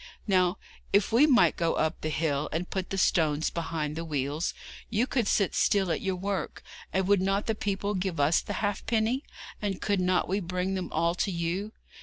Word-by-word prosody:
Now, 185 Hz, -2 st, +2 dB, 0.3 s
if 200 Hz, +2 st, +3 dB
we 250 Hz, +7 st, +6 dB
might 255 Hz, -5 st, +5 dB
go 165 Hz, -1 st, 0 dB
up 160 Hz, +2 st, -1 dB
the 155 Hz, -, -2 dB
hill, 150 Hz, -2 st, -1 dB
and 170 Hz, +3 st, -2 dB
put 190 Hz, -2 st, -3 dB
the 195 Hz, -, -3 dB
stones 155 Hz, -5 st, +2 dB
behind 160 Hz, -3 st, -3 dB
the 165 Hz, -, -3 dB
wheels, 150 Hz, 0 st, -2 dB, 0.3 s
you 230 Hz, +2 st, +1 dB
could 245 Hz, -5 st, 0 dB
sit 200 Hz, -2 st, +2 dB
still 195 Hz, -4 st, +2 dB
at 160 Hz, -, -1 dB
your 190 Hz, -1 st, -1 dB
work; 190 Hz, -2 st, -3 dB, 0.3 s
and 190 Hz, 0 st, 0 dB
would 200 Hz, -2 st, +4 dB
not 195 Hz, +2 st, +1 dB
the 225 Hz, -, 0 dB
people 205 Hz, -1 st, -2 dB
give 185 Hz, -3 st, -2 dB
us 145 Hz, +4 st, +4 dB
the -, -, -5 dB
halfpence? 225 Hz, +4 st, 0 dB, 0.4 s
and 200 Hz, -3 st, -2 dB
could 200 Hz, -2 st, 0 dB
not 180 Hz, 0 st, +2 dB
we 195 Hz, +3 st, 0 dB
bring 180 Hz, +1 st, -2 dB
them 185 Hz, -2 st, -3 dB
all 170 Hz, +1 st, +1 dB
to 180 Hz, -, -1 dB
you? 180 Hz, +4 st, -2 dB
185 Hz, 200 wpm, -28 LUFS, 165-200 Hz, 0.4 s, we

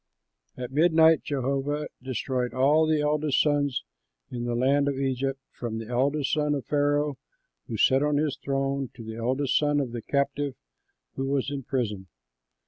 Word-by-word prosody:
At 125 Hz, 0 st, -5 dB
midnight 160 Hz, +1 st, +5 dB
Jehovah 140 Hz, +2 st, -1 dB, 0.2 s
destroyed 130 Hz, 0 st, -2 dB
all 150 Hz, +5 st, +4 dB
the 155 Hz, -1 st, +2 dB
eldest 150 Hz, -1 st, +1 dB
sons 145 Hz, -, +1 dB, 0.5 s
in 120 Hz, -1 st, -4 dB
the 120 Hz, 0 st, -1 dB
land 140 Hz, +4 st, +2 dB
of 140 Hz, -1 st, -1 dB
Egypt, 135 Hz, 0 st, -1 dB
from 115 Hz, -2 st, -5 dB
the 115 Hz, -, -5 dB
eldest 135 Hz, +3 st, +1 dB
son 150 Hz, -1 st, +1 dB
of 135 Hz, -5 st, -4 dB
Pharaoh 145 Hz, -1 st, +1 dB, 0.5 s
who -, -, -4 dB
sat 135 Hz, 0 st, +4 dB
on 150 Hz, 0 st, +2 dB
his 150 Hz, -1 st, 0 dB
throne 135 Hz, -1 st, -2 dB
to 115 Hz, -, -9 dB
the 110 Hz, 0 st, -7 dB
eldest 130 Hz, +4 st, +1 dB
son 145 Hz, -1 st, +2 dB
of 135 Hz, -4 st, -2 dB
the 120 Hz, -1 st, -5 dB
captive 140 Hz, +1 st, -1 dB, 0.6 s
who 135 Hz, 0 st, -1 dB
was 140 Hz, 0 st, 0 dB
in 140 Hz, -1 st, -3 dB
prison. 110 Hz, -7 st, -3 dB
140 Hz, 165 wpm, -27 LUFS, 130-145 Hz, 0.6 s, midnight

